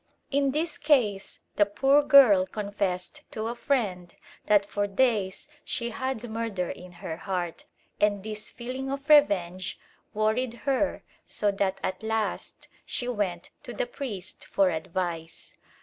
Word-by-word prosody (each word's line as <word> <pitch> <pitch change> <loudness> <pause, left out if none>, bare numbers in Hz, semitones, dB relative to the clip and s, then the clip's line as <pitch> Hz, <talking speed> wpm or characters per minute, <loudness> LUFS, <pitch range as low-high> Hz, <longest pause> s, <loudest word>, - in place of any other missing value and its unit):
In 280 0 +2
this 310 +3 -1
case 225 -10 +2 0.2
the 205 - +6
poor 270 +8 +4
girl 255 -11 +7
confessed 200 +5 -3
to 220 - -4
a - - -2
friend 195 -11 -1 0.3
that 205 -1 +5
for 205 0 -1
days 205 -3 +1 0.2
she 235 -1 -3
had 255 0 -3
murder 220 -5 -2
in 180 0 -10
her 160 -3 -3
heart, 180 -3 -3 0.3
and 205 -2 +2
this 215 0 -5
feeling 255 +2 -5
of 275 +1 -4
revenge 185 - +4 0.4
worried 225 +3 +1
her 280 +1 +1 0.2
so 205 -1 0
that 195 -1 -1
at 185 +2 -2
last 220 -1 -2 0.2
she 245 - -4
went 200 -7 -2
to - - -8
the - - 0
priest 245 - -7
for 195 -2 +3
advice. 165 0 -4
210 Hz, 140 wpm, -27 LUFS, 190-260 Hz, 0.4 s, girl